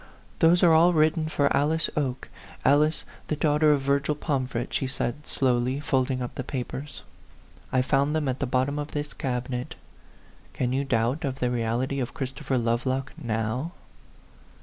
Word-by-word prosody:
"Those 170 +3 +5
are 170 -2 +7
all 170 +3 +6
written 155 0 +2
for 140 -2 +2
Alice 155 +3 +2
Oke 135 -4 -2 0.4
Alice, 150 +3 +3 0.2
the 155 - 0
daughter 150 0 +3
of 145 -2 +2
Virgil 140 +2 +1
Pomfret," 130 -5 -2
she 135 - 0
said, 130 +2 -3
slowly, 130 0 +1
folding 130 -3 0
up 120 - -5
the 130 - -4
papers. 135 +2 -5 0.3
" - - -27
I 130 -1 +3
found 140 +3 +1
them 155 -2 0
at 130 0 -1
the 140 - -1
bottom 130 +3 0
of 145 +1 -5
this 145 0 -3
cabinet. 125 -1 -3 0.8
Can 125 -1 -1
you 140 +1 0
doubt 120 +4 0
of 135 -2 -2
the 125 -2 0
reality 120 +3 -1
of 125 +3 -4
Christopher 135 -1 -2
Lovelock 125 +3 -1
now 120 +3 -2
135 Hz, 165 wpm, -26 LUFS, 125-150 Hz, 0.8 s, are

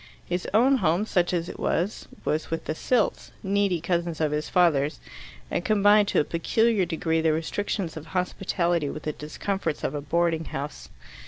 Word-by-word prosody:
His 180 +1 -2
own 255 +6 +5
home, 180 -1 +1
such 180 -5 +1
as 170 -2 -1
it - - -8
was, 180 +6 -1 0.2
was 155 +1 -1
with 165 - -3
the - - -1
Silts, 245 +9 0
needy 200 -2 +1
cousins 170 -1 -1
of 155 -2 +1
his 150 0 -2
father's, 155 -5 +2 0.5
and - - -1
combined 205 -1 +4
to - - +2
a - - +4
peculiar 205 +6 +1
degree 165 -1 0
the 160 -1 +3
restrictions 170 +2 -2
of 160 0 -8
hospitality 175 -2 0
with 155 - -6
the 150 - -2
discomforts 155 +3 -3
of - - -1
a 145 - -3
boarding 165 +2 0
house. 145 +1 -6
170 Hz, 175 wpm, -26 LUFS, 155-195 Hz, 0.5 s, own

